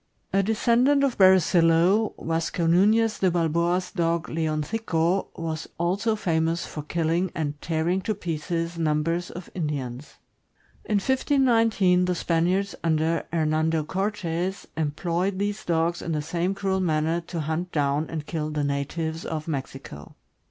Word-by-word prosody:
A 195 - +4
descendant 240 +7 +3
of 270 -3 +1
Bere 190 0 +8
zillo, 175 +5 +3
Yasco 165 +1 -1
Nunez 215 +6 +3
de 190 - +3
Balboa's 170 +1 0
dog, 170 -2 -1
Leoncico, 165 +3 0
was 160 -1 -4
also 200 +6 0
famous 165 -4 0
for 150 - -6
killing 170 +4 0
and 150 -2 -3
tearing 170 +3 0
to 215 +2 -2
pieces 170 -1 -3
numbers 165 +3 0
of 180 0 -9
Indi 150 -5 -2
ans. 125 +1 -7 0.7
In 210 - 0
1519, 225 -6 +3
the 180 0 0
Spaniards 180 +4 0
Junder 160 0 +1
Hernando 160 0 +1
Cortes 190 0 -2
em 155 -1 0
ployed 175 +5 -1
these 205 +1 -2
dogs 170 0 0
in 165 - -3
the 150 - 0
same 175 +4 -1
cruel 195 -1 -1
manner 160 -1 +1
to 170 -3 -3
hunt 160 +4 -3
down 145 +1 0
and 155 -2 -5
kill 155 -2 -3
the 150 -1 -2
natives 160 +4 -2
in 160 -1 -3
Mexico. 135 - -6
170 Hz, 145 wpm, -25 LUFS, 160-190 Hz, 0.7 s, Bere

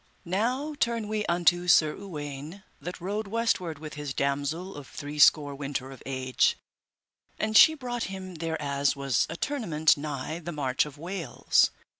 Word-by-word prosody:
Now 245 - -1
turn 230 -3 0
we 215 0 -2
unto 175 +1 +2
Sir 155 -3 +5
Uwaine, 150 -1 -7 0.2
that 180 +5 -6
rode 200 +4 -3
westward 195 -7 0
with 155 +1 -8
his 145 -2 -5
damosel 145 +7 -1
of 145 -2 -9
three 150 0 -7
score 145 0 +6
winter 135 -1 -4
of 135 - -12
age, 130 -1 +1 0.8
and 215 0 -1
she 315 +7 +9
brought 245 -4 -3
him 190 -1 -7
thereas 150 -4 -1
was 135 -3 +1
a 165 - -5
tournament 165 - +2
nigh 150 +2 -4
the 175 0 -6
march 140 -2 0
of 150 -1 -11
Wales. 170 -5 +1
160 Hz, 155 wpm, -28 LUFS, 145-195 Hz, 0.8 s, she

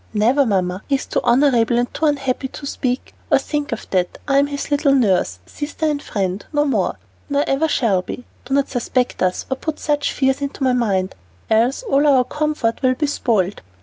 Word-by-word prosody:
"Never, 245 +6 +3
Mamma; 185 -2 0
he 280 - +2
is 270 - -3
too - - -1
honorable 240 -2 +3
and 245 0 0
too 315 - +1
unhappy 270 -2 -1
to 280 - -9
speak 255 -2 -3 0.2
or - - +7
think 295 -1 -3
of 230 - -5
that. 180 -2 0
I 275 -1 +4
am 280 - +3
his 285 +1 -5
little 285 -1 +3
nurse, 195 - +2
sister, 295 - -4
and 295 -2 0
friend, 195 -4 -2
no 295 -1 +2
more, 215 - 0 0.3
nor 285 0 +2
ever 275 +4 +1
shall 225 -11 +2
be. 245 +6 -8 0.2
Do 270 - -1
not 280 -1 +2
suspect 250 0 -1
us, 185 0 0
or 265 - 0
put 315 +2 -4
such 295 -1 0
fears 265 0 +1
into 280 0 -3
my 260 -1 +3
mind, 195 -6 0 0.4
else 235 - +2
all 295 - +2
our 265 -3 +5
comfort 295 -4 -1
will 255 -1 +3
be 300 - 0
spoiled." 215 -9 0
265 Hz, 205 wpm, -20 LUFS, 225-285 Hz, 0.4 s, or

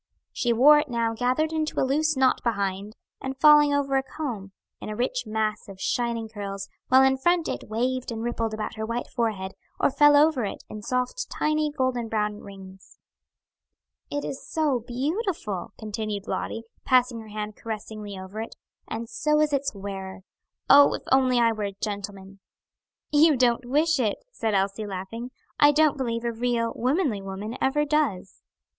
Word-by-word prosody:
She 240 - 0
wore 285 +6 +7
it 295 -1 -3
now 230 -1 0
gathered 255 +7 0
into 310 -1 -1
a - - +3
loose 305 +2 +1
knot 265 -1 +3
behind, 200 -2 -2 0.3
and 265 0 -4
falling 295 0 +7
over 280 -1 +1
a - - +2
comb, 245 -8 -6 0.3
in - - -7
a 215 - -4
rich 250 +1 -1
mass 215 -1 -2
of 195 -1 -11
shining 235 0 -1
curls, 200 -2 -6 0.2
while 260 +1 +6
in 265 0 +3
front 345 +3 +2
it - - -5
waved 250 +3 -1
and 225 0 -4
rippled 230 -2 -2
above 215 - -4
her 220 - -3
white 235 +1 -2
forehead, 210 -5 -2 0.3
or - - +3
fell 295 +1 +6
over 300 -4 +4
it, 200 - -5
in 215 - -7
soft, 250 - -2
tiny, 305 0 0
golden 255 -4 -1
brown 210 -1 -1
rings. 190 -1 -13 1.1
"It 290 0 -3
is 270 - -6
so 300 -6 0
beautiful!" 260 - -3
continued 215 -1 -4
Lottie, 225 - -3 0.2
passing 250 -2 +3
her 220 - -10
hand 210 0 -5
caressingly 215 -2 -6
over 190 +3 -6
it; 225 - -7 0.3
"and 230 +1 -5
so 300 +5 +1
is 305 -1 +2
its 275 -4 0
wearer. 195 -1 -6 0.5
Oh, 285 +1 +7
if - - -8
I 265 - +7
were - - +4
only 255 -1 +2 0.3
a - - -11
gentleman!" 200 -2 -5 0.7
"You 300 -1 +5
don't 245 0 +2
wish 305 +2 +2
it," 220 -5 +1
said 225 - -1
Elsie, 195 +2 0
laughing. 200 +6 -6 0.3
"I 290 0 +7
don't 305 0 +3
believe 235 -4 -2
a 235 - 0
real, 230 0 -1
womanly 255 - 0
woman 195 +4 -6
ever 295 +3 +2
does." 280 -11 -1
235 Hz, 175 wpm, -26 LUFS, 210-280 Hz, 1.1 s, wore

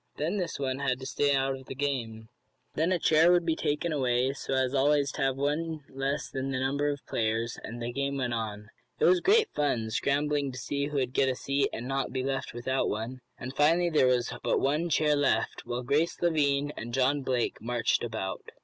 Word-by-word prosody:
Then 165 +7 -1
this 180 -4 -2
one 135 -1 -2
had 130 -2 0
to - - -6
stay 140 +1 +1
out 135 0 +1
of 130 -1 -12
the 135 - -6
game. 120 -6 -3 0.5
Then 165 +4 +1
a 185 - +3
chair 165 +1 +5
would 175 -1 +3
be 165 -1 +1
taken 155 +3 -1
away, 130 -1 +1
so 135 - -3
as 130 0 +1
always 140 0 +3
to - - -5
have 135 -1 +2
one 155 +3 -1
less 135 +2 -2
than 135 0 -4
the 135 - -1
number 140 +3 0
of 145 -2 -4
players, 115 +1 -1
and 120 +2 -7
the 120 0 -4
game 140 +1 -1
went 125 -3 -1
on. 105 -2 -4 0.3
It - - +3
was 180 +1 +5
great 435 - +4
fun, 120 -7 0
scrambling 140 +3 0
to - - -7
see 140 +3 -2
who 150 - -6
would 130 -2 -1
get 135 - +3
a 130 - 0
seat, 140 +2 0
and 120 +3 -5
not 135 0 -1
be 130 0 -2
left 135 0 -2
without 130 +3 -1
one, 115 +4 -4 0.2
and 130 +2 -7
finally 165 +4 +3
there 150 -4 +4
was 125 -1 +1
but - - +1
one 150 +5 +1
chair 150 -1 +3
left, 145 -1 0
while 120 +1 -3
Grace 145 +7 +1
Lavine 145 -4 +1
and 120 +1 -5
John 135 +2 +2
Blake 130 -2 -1
marched 120 0 0
about. 110 -5 -4
135 Hz, 220 wpm, -29 LUFS, 125-145 Hz, 0.5 s, chair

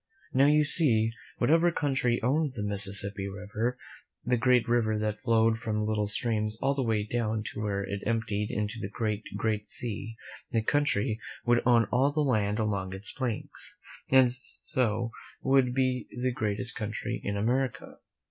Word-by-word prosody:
Now, 135 +2 +5
you 150 +1 +5
see, 115 -8 +3 0.3
whatever 165 +3 +3
country 130 -6 0
owned 145 +3 +1
the 105 - -3
Mississippi 100 0 +3
River, 105 +5 -3 0.5
the 125 +1 +2
great 125 0 +3
river 115 -2 +2
that 105 0 -2
flowed 115 0 +2
from 110 -1 -2
little 105 -1 0
streams 110 0 0
all 135 +1 +1
the 140 - -1
way 110 -4 0
down 110 -1 -2
to - - -5
where 100 -2 -1
it 100 +1 -4
emptied 110 -2 -1
into 105 +2 -3
the 100 - -4
great, 110 -1 -2 0.2
great 105 -2 -1
sea, 115 -1 -5 0.4
that 110 -1 +1
country 125 -6 +1 0.3
would 120 0 +3
own 120 -2 +5
all 135 +4 +3
the 150 +1 0
land 105 -7 +1
along 100 -4 -2
its 95 +3 -7
banks, 125 -5 -5 0.3
and 130 -2 +6 0.4
so 115 -2 0 0.3
would 135 -2 +3
be 130 -1 0
the 130 +1 0
greatest 110 +1 -2
country 105 0 -4
in 100 0 -2
America. 125 +4 -1
115 Hz, 160 wpm, -28 LUFS, 105-125 Hz, 0.5 s, and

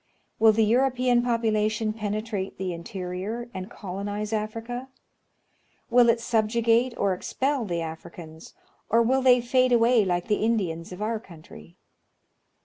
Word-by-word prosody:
Will 220 0 +7
the 220 0 +2
European 250 +1 +2
population 220 -2 0
penetrate 210 -2 -4
the 185 -1 -3
interior, 190 +6 -5
and 185 +2 -6
colonize 205 +1 -5
Africa? 225 +4 -4 1.0
Will 240 -1 +6
it 230 0 +3
subjugate 230 +2 +1
or 200 -2 +1
expel 265 +7 -2
the 170 -4 -2
Africans, 160 0 -9 0.3
or 230 +2 +4
will 260 +3 +2
they 250 -1 +5
fade 255 +1 +2
away 235 -1 +4
like 175 -2 -1
the 210 -1 0
Indians 185 -8 -1
of 180 +3 -6
our 220 +1 -1
country 155 - -15
220 Hz, 135 wpm, -26 LUFS, 190-235 Hz, 1.0 s, Will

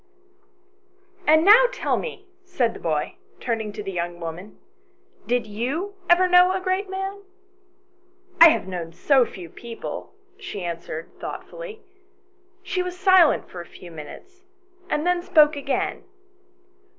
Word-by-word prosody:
II. 375 0 -34
"AND 315 +2 +5
now 445 +5 +8
tell - - -1
me," 450 -5 -6 0.2
said 265 -11 0
the - - -10
boy, 155 -3 -2 0.2
turning 225 -3 -2
to 210 - -7
the 195 - -5
young 175 -1 -4
woman, 170 +5 -7 0.3
" 370 - -34
did 245 -1 +2
you 260 - -3 0.2
ever 360 +1 +5
know 360 +1 +6
a 380 - -1
great 375 +1 -1
man 385 +1 -4 0.4
?" 375 0 -39
" 370 0 -21
I 335 - +12
have 250 - 0
known 170 -3 -5
so 260 - +3
few 180 -4 -10
people," 230 - -8 0.2
she 200 - -6
answered, 170 -1 -6
thoughtfully. 475 -3 -8 0.8
She 365 0 -2
was 360 0 -5
silent 375 -4 +5
for 175 - -8
a - - -10
few 175 - -13
minutes, 365 - -12 0.5
and 300 - -1
then 355 0 +2
spoke 310 -5 +4
again. 280 -1 -2
360 Hz, 150 wpm, -23 LUFS, -, 0.8 s, I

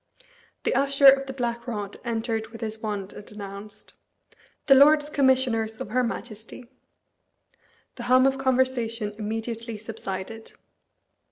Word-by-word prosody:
The - - +1
Usher 275 +1 +2
of 270 0 +7
the - - -4
Black 235 -2 -3
Rod 205 -4 -5
entered 225 -2 -2
with 225 0 -12
his 220 -1 -4
wand 205 -3 -4
and 205 - -11
announced, 205 0 -10 0.7
"The 275 - +7
Lords 295 +2 +6
Commissioners 255 -6 +1
of - - -6
her 250 +2 +2
Majesty." 230 0 -6 1.3
The 240 - -6
hum 255 +1 +6
of 270 0 +2
conversation 245 -5 0
immediately 225 +1 -4
subsided. 215 0 -6
230 Hz, 125 wpm, -25 LUFS, 215-260 Hz, 1.3 s, of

